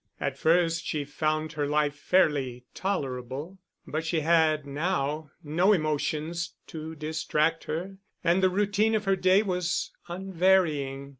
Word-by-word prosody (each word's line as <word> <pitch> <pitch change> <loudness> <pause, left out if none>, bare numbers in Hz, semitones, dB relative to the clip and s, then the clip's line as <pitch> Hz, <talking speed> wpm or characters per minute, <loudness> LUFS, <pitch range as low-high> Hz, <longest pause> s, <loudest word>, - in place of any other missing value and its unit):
At - - -2
first 165 0 +3
she 150 -3 -2
found 155 +2 -1
her 145 -2 -1
life 150 0 +1
fairly 145 -7 +1
tolerable; 145 -1 -3 0.3
but 155 +1 -3
she 165 0 0
had 155 -2 +3
now 150 0 -2
no 175 +7 +3
emotions 155 +1 -1
to 160 0 -7
distract 155 +1 0
her 180 +5 -4 0.3
and 175 +3 +3
the 185 - +5
routine 205 +3 +2
of 215 -1 -1
her 195 0 +3
day 185 +2 +4
was 180 -3 -1 0.2
unvarying. 175 -7 +1
160 Hz, 135 wpm, -27 LUFS, 150-185 Hz, 0.3 s, the